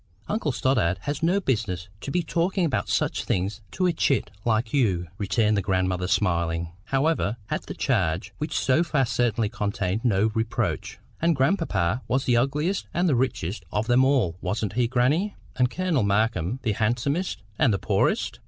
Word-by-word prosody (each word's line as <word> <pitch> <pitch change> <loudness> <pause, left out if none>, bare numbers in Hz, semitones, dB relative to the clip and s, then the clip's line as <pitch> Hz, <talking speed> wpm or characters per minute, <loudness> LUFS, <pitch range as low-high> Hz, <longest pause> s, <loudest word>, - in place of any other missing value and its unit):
"Uncle 205 -9 -1
Stoddart 110 -10 +1
has 145 0 -3
no 175 +5 +3
business 105 - -1
to - - -6
be 175 +4 0
talking 175 +3 0
about 150 - -1
such - - 0
things 100 +4 -1
to 185 - -1
a 180 - +3
chit 135 -9 +1
like 110 0 0
you," 95 -11 +1
returned 105 +2 +2
the 100 - +1
grandmother 95 -1 0
smiling, 85 -4 0
however, 135 -5 +1
at - - -2
the - - -6
charge, 80 +3 0
which 150 +2 -2
so 135 +5 +3
far 150 -6 +1
certainly 115 -1 +1
contained 100 +1 -2
no 110 -2 +2
reproach. 110 0 -2 0.2
"And 165 0 +3
grandpapa 135 - +1
was 130 +1 0
the 125 - +3
ugliest 150 +9 0
and 175 +1 +2
the 155 - +3
richest 115 -6 -1
of 105 +1 0
them 125 +2 +4
all—wasn't 100 -6 0
he, 120 +1 +2
grannie? 140 - +1 0.2
and 125 -1 +2
Colonel 180 -2 0
Markham 100 0 +1
the 115 - +1
handsomest 120 - -1 0.2
and 125 - +4
the 100 - +1
poorest?" - - 0
120 Hz, 170 wpm, -25 LUFS, 100-145 Hz, 0.2 s, them